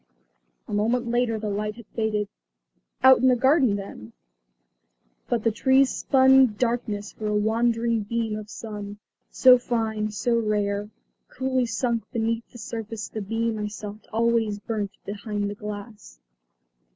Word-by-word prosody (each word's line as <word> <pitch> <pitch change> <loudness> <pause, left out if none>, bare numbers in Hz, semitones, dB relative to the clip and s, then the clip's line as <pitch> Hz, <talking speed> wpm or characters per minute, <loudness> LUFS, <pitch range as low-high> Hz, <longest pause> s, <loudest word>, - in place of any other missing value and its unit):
A - - -6
moment 235 +3 0
later 240 -2 +1
the 215 -1 -3
light 210 +1 -2
had 235 -1 -12
faded. 215 -2 0 0.8
Out 260 0 +8
in 260 - +3
the 255 - +5
garden 260 -3 +3
then? 155 - -8 1.2
But 235 -3 0
the 225 - +3
trees 265 +4 +3
spun 265 -4 +5
darkness 230 -4 -1
for 215 - -6
a 210 - 0
wandering 230 +1 +1
beam 225 +1 -2
of 215 -1 -7
sun. 205 -1 -7 0.3
So 255 -1 +6
fine, 220 -3 -1
so 235 +3 0
rare, 210 -1 -1 0.4
coolly 260 -1 -1
sunk 230 0 -1
beneath 230 0 -2
the 240 - -13
surface 225 -1 -6
the 215 - -5
beam 225 +2 -2
I 210 - -2
sought 210 0 -8
always 225 -2 +1
burnt 210 -1 -3 0.2
behind 205 0 -3
the 205 - -3
glass. 205 - -9
225 Hz, 145 wpm, -25 LUFS, 210-235 Hz, 1.2 s, Out